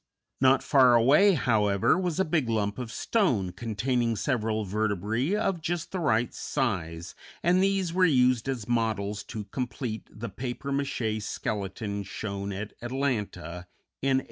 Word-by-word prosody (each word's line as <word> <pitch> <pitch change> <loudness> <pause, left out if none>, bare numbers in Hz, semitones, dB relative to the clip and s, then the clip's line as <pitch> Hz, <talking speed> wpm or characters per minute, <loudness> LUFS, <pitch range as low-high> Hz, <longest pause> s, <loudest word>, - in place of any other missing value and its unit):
Not 130 0 +4
far 130 -3 +5
away, 145 - +6
however, 105 -7 +2
was 180 -2 -1
a 190 - +3
big 155 -6 0
lump 105 0 0
of 120 -2 -5
stone 125 - +1
containing 115 +4 -1
several 110 0 -1
vertebræ 110 - 0
of 195 -5 -1
just 170 +1 -3
the 190 - -2
right 120 -7 +1
size, 85 - -2 0.3
and 180 +2 +4
these 195 -3 +1
were 185 +1 +3
used 125 -6 +3
as 120 -5 -3
models 110 -4 0
to 110 -2 -6
complete 120 0 -4
the 110 +2 -7
papier 125 +7 -5
maché 125 -6 -1
skeleton 100 0 -3
shown 100 0 -5
at 100 +2 -5
Atlanta, 105 - -3 0.3
in 135 -1 +3
1894. - - +3
115 Hz, 145 wpm, -28 LUFS, 105-140 Hz, 0.3 s, away